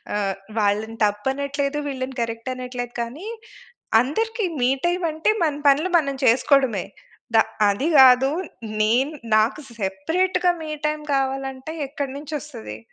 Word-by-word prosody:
ఆహ్, 195 -2 0 0.2
వాళ్ళని 215 +2 0
తప్పనట్లేదు, 275 +7 -1
వీళ్ళని 260 -1 -4
కరెక్ట్ 230 +2 -5
అనట్లేదు, 250 -1 -5
కానీ 295 - -8 0.7
అందరికి 445 - -1 0.2
మీ 245 - +4 0.2
టైం 355 +1 +1
అంటే, 320 +6 0
మన 300 -3 +1
పనులు 305 +7 +3
మనం 275 -3 -2
చేసుకోడమే. 245 -4 +3 0.5
దా 220 - +8 0.3
అది 205 +10 +1
గాదు 265 0 +7 0.5
నేను 245 +7 +2 0.2
నాకు 220 +7 +2 0.2
సెపరేట్‌గా 340 - 0
మీ 310 - -6 0.2
టైం 300 0 -2
కావాలంటే 270 +2 -2 0.2
ఎక్కడి 280 -2 -4
నుంచొస్తది? 285 - -7
265 Hz, 120 wpm, -23 LUFS, 230-300 Hz, 0.7 s, దా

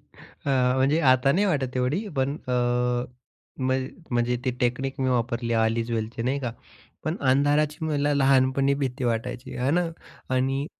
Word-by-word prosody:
अ, 140 - -9 0.3
म्हणजे 140 +5 +3
आता 130 -1 +4
नाही 200 +6 +2
वाटत 135 -7 -1
एवढी, 145 - 0
पण 135 +2 0
अ, - - 0 1.1
म्हण 130 0 0 0.2
म्हणजे 120 0 +1
ती 130 - +2
टेकनिक 130 +2 -1
मी 130 - +1
वापरली, 120 -1 0
ऑल 110 0 +2
इज 115 0 -2
वेलची 115 +1 -3
नाही 130 +4 0
का, 120 -4 -3 0.5
पण 160 +4 -1
अंधाराची 150 +3 +2
मला 145 -1 +1
लहानपणी 135 0 +3
भीती 130 0 -2
वाटायची, 125 +2 -3
हे 125 +2 +1
ना. 175 +3 +2 0.5
आणि 135 +2 0
130 Hz, 155 wpm, -25 LUFS, 125-140 Hz, 1.1 s, आता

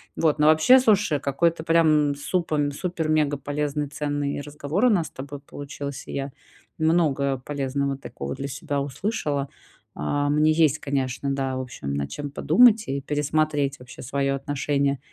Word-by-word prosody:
Вот, 155 -2 +2
но 150 - +3
вообще, 155 +12 +7
слушай, 210 - +3
какой-то, 160 +4 0
прям 155 -3 +3
супом 150 -1 -1
супер-мегаполезный, 150 -3 -1
ценный 145 0 -2
разговор 150 - -2
у - - +6
нас 175 -6 +1
с - - -15
тобой 140 +2 -8
получился. 140 -1 -7
Я 135 0 -3 0.5
много 150 -5 +1
полезного 140 0 -2
такого 135 - -6
для 140 +1 -4
себя 140 +1 -3
услышала. 145 - -2 0.5
А, 145 - -1
мне 150 +1 +3
есть, 155 -2 +3
конечно, 135 -1 -2
да, 135 -1 -2
в - - -2
общем, 95 - -6
над 70 0 -2
чем 145 -1 -5
подумать 225 +6 +5
и 140 +1 -1
пересмотреть 145 -1 0
вообще 125 0 -12
своё 135 +1 -1
отношение 140 0 -1
145 Hz, 145 wpm, -24 LUFS, 140-155 Hz, 0.5 s, вообще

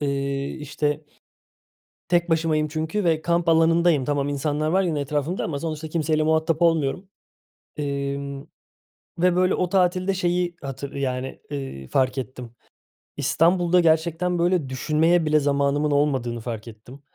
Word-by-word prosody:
Eee, 140 -1 -2
işte, 150 0 -3 1.0
tek 175 0 +2
başımayım 160 -2 +1
çünkü 160 +6 -2
ve 160 -2 +2
kamp 170 +1 0
alanındayım. 165 -3 +4
Tamam, 145 0 0
insanlar 145 +2 -1
var 190 +4 +2
yine 160 -5 -1
etrafımda 150 +5 -2
ama 145 -3 -3
sonuçta 155 0 -4
kimseyle 155 -1 0
muhatap 160 +1 +1
olmuyorum, 165 +2 +1 0.7
emm, 140 -1 -3 0.8
ve, 180 0 +3
böyle, 185 +1 +3
o 180 - -1
tatilde 185 +1 +2
şeyi 175 -1 0
hatır 140 +1 -6
yani, 130 -1 -3
eee, 135 - -6
fark 130 0 +1
ettim. 125 -2 -6 0.6
İstanbul'da 175 +1 +3
gerçekten, 170 +2 +1
böyle, 175 -5 +1
düşünmeye 160 +6 +2
bile 155 0 +3
zamanımın 145 +1 +1
olmadığını 135 -5 0
fark 115 -1 -6
ettim. 115 +5 -12
155 Hz, 135 wpm, -23 LUFS, 140-170 Hz, 1.0 s, alanındayım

